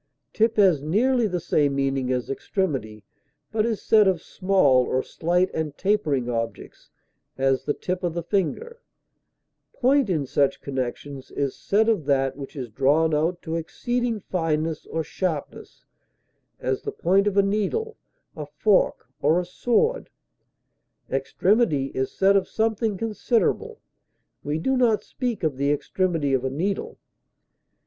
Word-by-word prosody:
Tip 225 Hz, 0 st, +2 dB
has 185 Hz, -8 st, +5 dB
nearly 230 Hz, -, +2 dB
the 180 Hz, -3 st, -2 dB
same 145 Hz, -4 st, +1 dB
meaning 135 Hz, -2 st, 0 dB
as 125 Hz, -1 st, -1 dB
extremity, 135 Hz, -, -3 dB, 0.5 s
but 220 Hz, 0 st, +1 dB
is 225 Hz, -3 st, -3 dB
said 215 Hz, -2 st, +5 dB
of 185 Hz, -3 st, +2 dB
small 185 Hz, -10 st, +2 dB
or 130 Hz, +1 st, -1 dB
slight 180 Hz, +3 st, 0 dB
and 155 Hz, -3 st, -3 dB
tapering 160 Hz, -11 st, 0 dB
objects; 115 Hz, -1 st, -5 dB, 0.5 s
as, 135 Hz, 0 st, +1 dB
the 145 Hz, -, 0 dB
tip 180 Hz, 0 st, -3 dB
of 170 Hz, -2 st, -1 dB
the 170 Hz, -, -2 dB
finger; 445 Hz, -, -2 dB, 0.9 s
point 270 Hz, -2 st, +2 dB
in 155 Hz, -6 st, 0 dB
such 140 Hz, +1 st, +1 dB
connections 135 Hz, +1 st, -5 dB
is 140 Hz, -2 st, -2 dB
said 215 Hz, +3 st, +1 dB
of 210 Hz, -10 st, +1 dB
that 135 Hz, -2 st, +1 dB
which 140 Hz, +1 st, -9 dB
is 125 Hz, -5 st, -6 dB
drawn 145 Hz, +6 st, +2 dB
out 165 Hz, +4 st, 0 dB
to 160 Hz, -1 st, -3 dB
exceeding 240 Hz, +7 st, -2 dB
fineness 165 Hz, -3 st, -2 dB
or 160 Hz, -, -2 dB
sharpness, 160 Hz, -4 st, -5 dB, 0.7 s
as 130 Hz, 0 st, -1 dB
the -, -, -4 dB
point 195 Hz, +4 st, +2 dB
of 205 Hz, -1 st, 0 dB
a 200 Hz, -, +6 dB
needle, 215 Hz, -, -1 dB, 0.4 s
a 150 Hz, -2 st, -6 dB
fork, 185 Hz, +7 st, +1 dB, 0.2 s
or 155 Hz, +4 st, +3 dB
a 180 Hz, -, -3 dB
sword; 245 Hz, -, 0 dB, 1.0 s
extremity 145 Hz, -, +1 dB
is 130 Hz, 0 st, -2 dB
said 195 Hz, +1 st, +3 dB
of 195 Hz, -, +2 dB
something 220 Hz, -2 st, 0 dB
considerable; 235 Hz, -, -1 dB, 0.6 s
we 145 Hz, +2 st, -1 dB
do 265 Hz, +12 st, 0 dB
not 235 Hz, -4 st, +2 dB
speak 245 Hz, -7 st, -4 dB
of 150 Hz, -5 st, 0 dB
the 140 Hz, +1 st, +1 dB
extremity 150 Hz, 0 st, 0 dB
of 130 Hz, -1 st, +1 dB
a 130 Hz, -, 0 dB
needle. 180 Hz, +9 st, -3 dB
170 Hz, 145 wpm, -24 LUFS, 140-210 Hz, 1.0 s, a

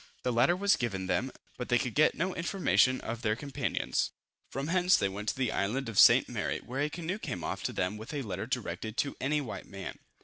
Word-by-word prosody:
The 125 Hz, -, 0 dB
latter 125 Hz, +9 st, +4 dB
was 200 Hz, +2 st, +3 dB
given 100 Hz, -6 st, -2 dB
them, 130 Hz, +7 st, 0 dB, 0.3 s
but 125 Hz, -, -4 dB
they 120 Hz, -, +5 dB
could 125 Hz, -2 st, -2 dB
get 155 Hz, -, +4 dB
no 185 Hz, +2 st, -1 dB
information 170 Hz, -7 st, +2 dB
of 115 Hz, 0 st, -5 dB
their 110 Hz, -2 st, +1 dB
companions. 140 Hz, +3 st, -1 dB, 0.4 s
From 135 Hz, +4 st, -4 dB
hence 180 Hz, +1 st, +4 dB
they 100 Hz, -, +1 dB
went 105 Hz, +2 st, -3 dB
to -, -, -1 dB
the 125 Hz, -4 st, 0 dB
island 115 Hz, +7 st, -1 dB
of 110 Hz, -, 0 dB
St. -, -, +8 dB
Mary, -, -, -2 dB
where 130 Hz, +3 st, -5 dB
a 150 Hz, -, +1 dB
canoe 175 Hz, +5 st, -4 dB
came 90 Hz, -, -4 dB
off -, -, -3 dB
to -, -, 0 dB
them 90 Hz, +4 st, -1 dB
with 110 Hz, +2 st, -8 dB
a 145 Hz, -3 st, -3 dB
letter 100 Hz, -1 st, -4 dB
directed 110 Hz, -2 st, -3 dB
to 140 Hz, -, 0 dB
any 150 Hz, +3 st, +1 dB
white 125 Hz, -, -6 dB
man. 95 Hz, -1 st, -7 dB
125 Hz, 230 wpm, -30 LUFS, 105-150 Hz, 0.4 s, St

